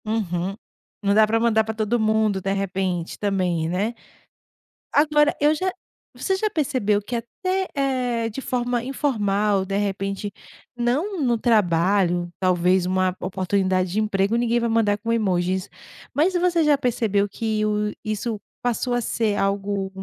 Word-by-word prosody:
Uhum, 195 -4 -2 0.5
não 200 0 +3
dá 215 +1 +5
para 225 +1 +1
mandar 225 -1 +3
para 220 0 -5
todo 220 +2 0
mundo, 215 -2 +2
de 195 - -1
repente, 185 -3 -2
também, 180 -5 0
né. 200 +7 -1 1.0
Agora 295 0 +4
eu 300 +2 +4
já 370 +4 -1 0.4
você 385 - -1
já 430 +3 0
percebeu 255 - 0
que 220 +4 -5
até, 370 - -2
eh, 250 -5 0
de 230 +5 -6
forma 245 -2 -1
informal, 210 -7 0
de 195 +1 -2
repente, 200 0 -2 0.4
não 290 - -1
no 240 -4 +2
trabalho, 180 -5 +2
talvez 185 0 +2
uma 185 0 +1
oportunidade 185 -1 0
de 210 - +1
emprego 200 0 +1
ninguém 235 0 +2
vai 235 - 0
mandar 220 -2 +2
com 230 +2 -2
emojis. 185 -3 0 0.4
Mas 330 +6 +2
você 350 -2 +2
já 295 -1 +4
percebeu 215 -6 0
que 215 +1 -1
o 210 0 0
isso 215 +1 -3 0.2
passou 245 +1 -1
a 245 - +2
ser 220 -2 0
algo 195 0 -1
215 Hz, 150 wpm, -23 LUFS, 195-240 Hz, 1.0 s, dá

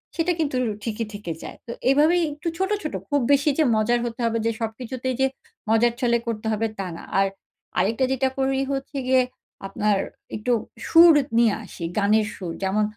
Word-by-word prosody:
সেটা 345 +2 +1
কিন্তু 285 -4 0
র - - 0
ঠিকই 225 0 -2
থেকে 205 -5 -5
যায়। - - -8
তো - - -5 0.2
এভাবেই 310 +6 +4
একটু 300 +3 -7
ছোট, 380 +1 0
ছোট 305 - -4 0.2
খুব 285 -2 +2
বেশি 285 +2 +4
যে - - +6
মজার 240 +3 +2
হতে 235 0 -5
হবে 230 0 +1
যে 230 - +2
সবকিছুতেই 250 +3 -3
যে - - +5 0.4
মজার 230 +1 +4
ছলে 235 -1 +3
করতে 220 -1 -3
হবে, 225 +1 0
তা 195 - -2
না। - - -9 0.2
আর 195 - +4 0.5
আরেকটা 225 +7 +2
যেটা 265 0 +1
করি 270 0 +1
হচ্ছে 275 +1 -4
গিয়ে, 260 0 +5 0.5
আপনার 205 +1 +1 0.4
একটু 215 +4 -2 0.4
সুর 335 0 +8 0.2
নিয়ে 230 -3 +5
আসি। 185 -3 -9
গানের 210 +1 +3
সুর। 175 -4 -5
যেমন 210 +3 +1
235 Hz, 185 wpm, -24 LUFS, 215-270 Hz, 0.5 s, সুর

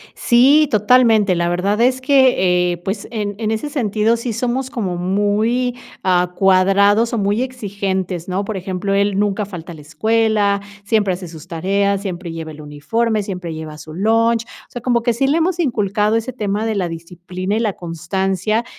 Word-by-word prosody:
Sí, 275 +6 +4
totalmente. 220 -2 +4
La 170 0 0
verdad 195 +5 0
es 255 +1 +3
que, 245 -10 +3
eh, - - -5
pues, 195 +4 -5
en 210 -3 -3
en 220 -2 -1
ese 225 +7 -2
sentido 225 -5 +1
sí 235 +1 -4
somos 250 +3 -2
como 200 -9 -3
muy, 205 +7 0 0.3
ah, 180 -1 +2
cuadrados 200 +4 +3
o - - 0
muy 205 +2 0
exigentes, 195 -8 -3
¿no? 190 +2 -1
Por 215 - -4
ejemplo, 190 +1 -3
él 200 0 +1
nunca 205 0 0
falta 175 -3 -9
a - - -9
la 155 - -12
escuela, 210 +4 +1 0.2
siempre 205 -2 +1
hace 180 0 -8
sus 160 -2 -11
tareas, 195 +4 0
siempre 180 -3 -5
lleva 160 -1 -6
el 155 0 -11
uniforme, 210 +10 -1
siempre 180 -4 -5
lleva 155 -1 -7
su 155 0 -10
lunch, 225 +4 +2
o - - -17
sea, 245 - -7
como 240 -2 +2
que 235 0 +1
sí 245 +4 0
le 290 +4 +2
hemos 345 +2 0
inculcado 210 - +1
ese 225 +3 -1
tema 210 -3 -2
de 220 - -1
la 185 -3 -1
disciplina 180 +3 -5
y - - 0
la 220 -3 0
constancia, 190 +6 -2
205 Hz, 185 wpm, -18 LUFS, 180-230 Hz, 0.3 s, Sí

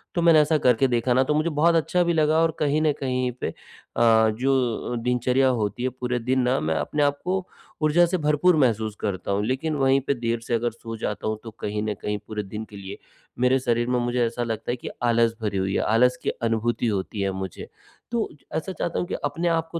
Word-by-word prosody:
तो 170 - +1
मैंने 165 -2 +7
ऐसा 150 +1 +2
करके 125 -1 +3
देखा 120 +1 +1
ना 130 +2 +4
तो 140 - 0
मुझे 155 +2 +1
बहुत 165 +2 +3
अच्छा 165 +2 +2
भी 170 - +1
लगा 155 -1 +3
और 165 - +2
कहीं 150 0 +1
न 155 -1 +3
कहीं 130 -1 0
पे - - -1
अ, - - -9 0.9
जो 130 -3 0
दिनचर्या 125 +2 +2
होती 115 -1 -1
है 130 - +1
पूरे 125 0 -3
दिन 130 +3 0
ना 125 +1 +1
मैं 80 +1 -1
अपने 145 - 0
आप 145 0 +1
को 185 0 -1 0.4
ऊर्जा 155 +3 +5
से 180 +2 -1
भरपूर 150 +3 +3
महसूस 110 -6 +1
करता 100 -2 -2
हूँ 100 +1 0
लेकिन 135 +6 -1
वहीं 135 -1 +3
पे - - +3
देर 115 -2 -2
से 120 - -4
अगर 120 +1 0
सो 115 0 -8
जाता 105 -2 -3
हूँ 110 0 -1
तो 115 - -8
कहीं 105 0 -3
न 110 -1 -1
कहीं 105 0 -2
पूरे 105 -1 -4
दिन 105 +3 -6
के 105 - -12
लिए, 95 0 -8 0.4
मेरे 125 +1 +3
शरीर 120 -1 0
में 125 0 +1
मुझे 120 0 +1
ऐसा 115 +1 -2
लगता 115 0 -3
है - - -1
कि - - -7
आलस 115 -1 +3
भरी 105 -2 -2
हुई 95 +1 -1
है, - - +2
आलस 125 +3 +3
की - - 0
अनुभूति 115 +1 -1
होती 100 0 -2
है 100 0 0
मुझे। 95 -1 -6 0.4
तो 235 -2 -1 0.3
ऐसा 160 +4 -2
चाहता 170 -2 -2
हूँ 175 - -2
कि - - -5
अपने 175 +1 -1
आप 165 -1 +1
को 170 - -3
125 Hz, 235 wpm, -24 LUFS, 110-150 Hz, 0.9 s, मैंने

